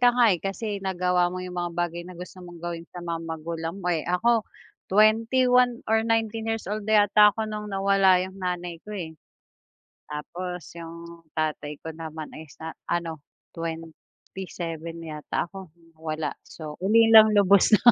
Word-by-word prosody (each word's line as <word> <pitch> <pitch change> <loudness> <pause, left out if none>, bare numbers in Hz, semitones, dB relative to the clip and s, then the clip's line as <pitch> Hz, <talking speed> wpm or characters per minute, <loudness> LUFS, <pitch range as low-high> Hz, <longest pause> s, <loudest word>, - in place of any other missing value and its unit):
ka 245 - +7
nga, 240 -3 +5
eh, 175 - 0
kasi 200 +1 -3
nagawa 180 -2 +1
mo 185 +1 -5
yung 180 - -7
mga 175 0 -1
bagay 175 0 -1
na 185 - -9
gusto 180 +1 -9
mong 175 -2 -11
gawin 170 -1 -4
sa 175 - -6
mga 165 -1 -3
magulang 165 +2 -4
mo. 180 - -1
Eh, 160 - -1
ako 220 +5 +2 0.4
twenty 220 +5 +4
one 250 -1 +4
or 220 - +4
nineteen 225 0 0
years 225 0 -2
old 210 -1 -3
yata 210 -1 +6
ako 220 - -2
nung 210 0 -4
nawala 195 -2 +4
yung 190 +1 -10
nanay 175 -2 -3
ko 210 - -6
eh. 170 -5 -5 1.0
Tapos 175 +3 -6
yung 170 0 -10
tatay 150 -2 -2
ko 160 - -5
naman 160 -1 -7
ay 160 +1 -10
sa 160 +3 -8 0.2
ano, 170 -2 -2 0.3
twenty 165 +3 -7
seven 165 -1 -6
yata 155 +3 -4
ako? 190 -2 -9 0.3
Wala. 155 -1 -3 0.2
So, 155 -2 -9
ulilang 220 +1 +7
lubos 200 +1 +6
na. 240 +3 +7
180 Hz, 170 wpm, -26 LUFS, 165-210 Hz, 1.0 s, ka